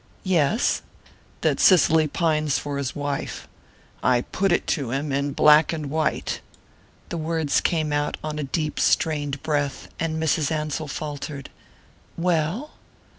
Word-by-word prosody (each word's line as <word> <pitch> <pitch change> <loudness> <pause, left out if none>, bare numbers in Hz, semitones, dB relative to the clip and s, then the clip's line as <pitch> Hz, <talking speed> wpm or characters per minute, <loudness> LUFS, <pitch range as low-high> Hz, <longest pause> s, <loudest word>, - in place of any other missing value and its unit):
"Yes?" 185 - +2 0.6
"That - - +1
Cicely 160 -4 +5
pines 155 -2 +1
for 145 -1 -4
his 135 -2 -3
wife. 145 -1 -4 0.5
I 125 -1 +3
put 195 +8 -1
it 175 - +2
to 140 -7 -3
him 140 +4 -2
in 140 +1 -1
black 150 +2 +6
and 155 -4 -4
white." 160 0 -1 0.7
The 170 - -3
words 160 -2 0
came 155 -3 0
out 145 0 0
on 155 0 -3
a - - -1
deep 155 +2 -2
strained 145 -3 +1
breath, 145 -3 -1
and 160 -1 -1
Mrs. 160 -2 +1
Ansell 155 0 -2
faltered: 145 -1 -6 0.7
"Well?" 175 - 0
150 Hz, 135 wpm, -24 LUFS, 145-160 Hz, 0.7 s, black